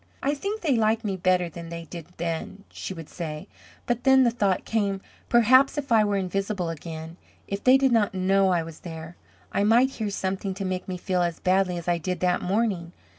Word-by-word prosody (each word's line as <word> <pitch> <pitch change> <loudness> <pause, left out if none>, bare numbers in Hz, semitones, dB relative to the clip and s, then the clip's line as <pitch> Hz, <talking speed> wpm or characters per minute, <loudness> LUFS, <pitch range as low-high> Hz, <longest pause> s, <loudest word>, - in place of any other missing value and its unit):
"I 280 - +2
think 400 +9 -4
they 295 -7 +2
like 225 0 +2
me 195 -2 -1
better 185 -1 +2
than 170 0 -9
they 170 0 -6
did 165 -1 -9
then," 170 +4 -4
she - - -6
would 165 -4 -7
say; 155 -3 -6 0.4
but 240 -1 -1
then 265 0 +6
the 240 - +3
thought 200 -5 0
came, 200 -3 0 0.3
"Perhaps 255 +5 +5
if 280 -3 -4
I 220 -2 +6
were 205 -1 +1
invisible 195 -1 -2
again, 165 +1 -7 0.3
if 200 0 -4
they 255 +1 +7
did 270 -1 +2
not 215 -4 +2
know 190 +1 +3
I 175 -2 +2
was 160 -1 -10
there, 160 0 -8 0.4
I 200 - +1
might 240 +5 +4
hear 220 -5 -3
something 190 -1 -3
to 195 0 -4
make 185 -1 -3
me 185 -1 -4
feel 180 0 -1
as 170 -2 -1
badly 185 -1 +2
as 170 - -7
I 175 -1 +1
did 180 +2 -3
that 180 -1 +2
morning." 185 -3 -1
190 Hz, 215 wpm, -25 LUFS, 175-225 Hz, 0.4 s, they